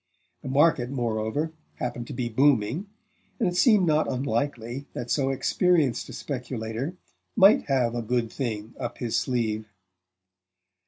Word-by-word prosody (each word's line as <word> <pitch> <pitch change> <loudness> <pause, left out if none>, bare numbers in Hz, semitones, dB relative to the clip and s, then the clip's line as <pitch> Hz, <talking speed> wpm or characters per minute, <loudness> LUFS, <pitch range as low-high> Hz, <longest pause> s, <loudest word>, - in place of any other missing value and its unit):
The 135 - -6
market, 135 -3 +3
moreover, 120 +4 -1 0.2
happened 120 -1 -4
to - - -6
be 120 -1 -2
booming, 130 - +2 0.5
and 225 - +2
it 175 - -1
seemed 210 -2 +5
not 155 -3 +2
unlikely 130 0 -2
that 120 0 -5
so 135 -2 +2
experienced 145 -1 +1
a - - -8
speculator 125 +2 -4 0.4
might 200 0 +6
have 125 -4 +2
a 120 - -2
"good 115 0 -1
thing" 115 -4 -4
up 120 -1 -4
his 120 -2 -2
sleeve. 110 -4 -1
125 Hz, 140 wpm, -26 LUFS, 115-145 Hz, 0.5 s, might